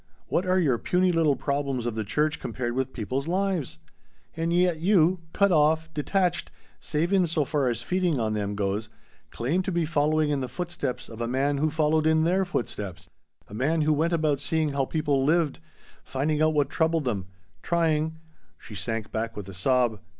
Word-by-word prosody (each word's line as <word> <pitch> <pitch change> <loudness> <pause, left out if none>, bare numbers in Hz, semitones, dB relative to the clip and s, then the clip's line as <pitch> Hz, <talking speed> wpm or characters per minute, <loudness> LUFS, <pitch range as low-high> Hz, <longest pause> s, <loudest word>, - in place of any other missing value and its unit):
What 185 - 0
are 185 0 +3
your 135 -9 +2
puny 180 0 +2
little 160 -4 +3
problems 140 -2 -2
of 120 - -1
the 110 0 -2
church 150 +9 0
compared 120 0 -3
with 130 +1 -1
people's 130 +5 -3
lives? 180 - -1 0.6
And 165 +1 -1
yet 175 -2 +2
you 180 0 +3
cut 200 -1 +3
off 160 0 +2
detached 175 +2 0 0.3
save 165 +5 -1
in 185 -3 +4
so 155 -2 +1
far 140 -1 0
as 120 -1 -1
feeding 180 -6 0
on 110 -2 0
them 105 -1 -2
goes 100 +2 -2 0.4
claim 150 +11 -1
to 190 - -3
be 170 -2 +1
following 155 -1 +1
in 145 - 0
the 130 -2 -4
footsteps 175 -3 -4
of 115 0 -9
a 115 - -1
man 140 +3 0
who 155 +2 +2
followed 155 0 +2
in 160 0 +3
their 185 +3 +2
footsteps 100 - -4 0.4
a - - -13
man 150 +9 +1
who 155 0 +3
went 160 +3 +1
about 155 -4 +1
seeing 155 +1 0
how 140 -1 0
people 145 -2 0
lived 155 0 +2 0.4
finding 150 +3 -1
out 155 0 +3
what 145 -2 +1
troubled 160 -1 +1
them 100 -7 -2 0.3
trying 160 -2 0 0.2
" - - -39
She 110 - -12
sank 115 +1 -3
back 115 0 -3
with 100 -2 -6
a - - -8
sob. 120 +3 +1
150 Hz, 195 wpm, -26 LUFS, 125-165 Hz, 0.6 s, in